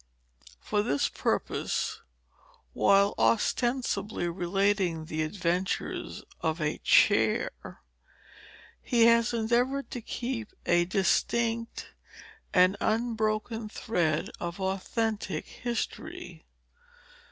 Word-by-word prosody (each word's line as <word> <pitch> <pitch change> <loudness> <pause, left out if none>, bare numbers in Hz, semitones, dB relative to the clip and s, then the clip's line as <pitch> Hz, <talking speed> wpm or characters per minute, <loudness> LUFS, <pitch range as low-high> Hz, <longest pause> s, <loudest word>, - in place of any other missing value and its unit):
For 205 - 0
this 145 -10 +1
purpose, - - -1 0.7
while 200 0 +4
ostensibly 230 -4 +1
relating 180 -1 0
the 155 0 -3
adventures 180 +2 -2 0.2
of 160 +1 -1
a 155 0 -1
Chair, - - +4 1.3
he 235 -3 +3
has 230 0 +5
endeavored 240 +4 0
to 245 - -5
keep 235 -1 -4
a 175 0 +3
distinct 230 +5 0 0.6
and 185 +2 +4
unbroken 220 -1 -1
thread 170 -9 -1
of 175 +2 -5
authentic 195 -1 -2
history. 240 -1 -5
205 Hz, 85 wpm, -28 LUFS, 180-230 Hz, 1.3 s, has